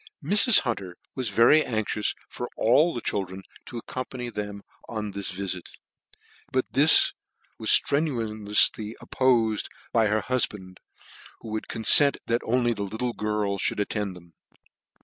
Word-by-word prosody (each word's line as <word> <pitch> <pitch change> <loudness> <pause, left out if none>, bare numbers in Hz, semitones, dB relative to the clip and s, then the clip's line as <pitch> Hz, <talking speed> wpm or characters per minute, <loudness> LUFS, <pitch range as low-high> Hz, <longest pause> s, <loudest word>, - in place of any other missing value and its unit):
Mrs. 210 +3 +6
Hunter 95 -8 -5 0.2
was 130 -4 -4
very 115 +9 +4
anxious 110 -2 -2
for 125 - -7
all 150 +9 +3
the 120 - -6
children 95 -2 -4 0.2
to 120 - -8
accompany 125 +1 -7
them 105 -1 -7 0.3
on 105 -2 -5
this 100 0 -4
vifk; 90 -1 -4 0.8
but 130 0 0
this 150 +3 +5 0.5
was - - -3
ftrenuoufly 110 -7 +2
oppofed 115 -5 0 0.3
by 115 -2 +2
her 105 0 -1
hufband, 105 -7 -3 0.6
who 115 - -10
would 110 0 -5
confent 140 +5 +6
that 115 +1 -1
only 120 0 0
the 105 - -7
little 110 +5 -4
girl 105 -2 -3
fbould - - -1
attend 105 -2 -3
them. 85 -1 -17
110 Hz, 135 wpm, -25 LUFS, 100-125 Hz, 0.8 s, Mrs